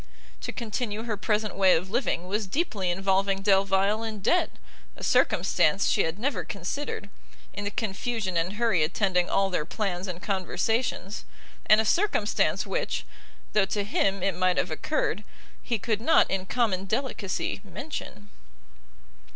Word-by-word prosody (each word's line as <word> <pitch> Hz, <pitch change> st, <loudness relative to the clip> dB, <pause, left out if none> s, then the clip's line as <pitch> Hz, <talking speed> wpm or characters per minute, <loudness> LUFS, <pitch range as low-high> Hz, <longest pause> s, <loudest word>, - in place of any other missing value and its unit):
To -, -, -3 dB
continue 225 Hz, -2 st, -3 dB
her 230 Hz, -2 st, -2 dB
present 210 Hz, 0 st, -1 dB
way 190 Hz, -1 st, +5 dB
of 185 Hz, +4 st, -2 dB
living 225 Hz, -7 st, 0 dB
was 205 Hz, +2 st, -1 dB
deeply 205 Hz, -, -1 dB
involving 195 Hz, +1 st, +1 dB
Delvile 195 Hz, +1 st, +3 dB
in 220 Hz, -2 st, -4 dB
debt, 340 Hz, -, +2 dB, 0.5 s
a -, -, -11 dB
circumstance 195 Hz, -, +3 dB
she -, -, +3 dB
had 160 Hz, +3 st, -3 dB
never 225 Hz, -5 st, -1 dB
considered, 200 Hz, -, -4 dB, 0.5 s
in 205 Hz, -, -5 dB
the -, -, 0 dB
confusion 210 Hz, -1 st, -2 dB
and 170 Hz, +3 st, 0 dB
hurry 220 Hz, -6 st, +2 dB
attending 180 Hz, +2 st, +1 dB
all 195 Hz, 0 st, +2 dB
their 165 Hz, -, 0 dB
plans 190 Hz, +1 st, -3 dB
and 180 Hz, -2 st, -5 dB
conversations, 200 Hz, +2 st, -1 dB, 0.4 s
and 215 Hz, -, +7 dB
a 220 Hz, -, +2 dB
circumstance 410 Hz, -, +2 dB
which, -, -, -2 dB, 0.5 s
though 210 Hz, -2 st, +4 dB
to 200 Hz, +1 st, -1 dB
him 195 Hz, -2 st, 0 dB
it 195 Hz, -, +2 dB
might 185 Hz, 0 st, +2 dB
have -, -, 0 dB
occurred, -, -, -1 dB, 0.4 s
he 235 Hz, -, -1 dB
could 215 Hz, 0 st, -1 dB
not 320 Hz, +8 st, +4 dB
in 190 Hz, -1 st, -1 dB
common 200 Hz, -6 st, +1 dB
delicacy 210 Hz, -3 st, -2 dB
mention. 190 Hz, -, -7 dB
200 Hz, 150 wpm, -27 LUFS, 190-225 Hz, 0.5 s, and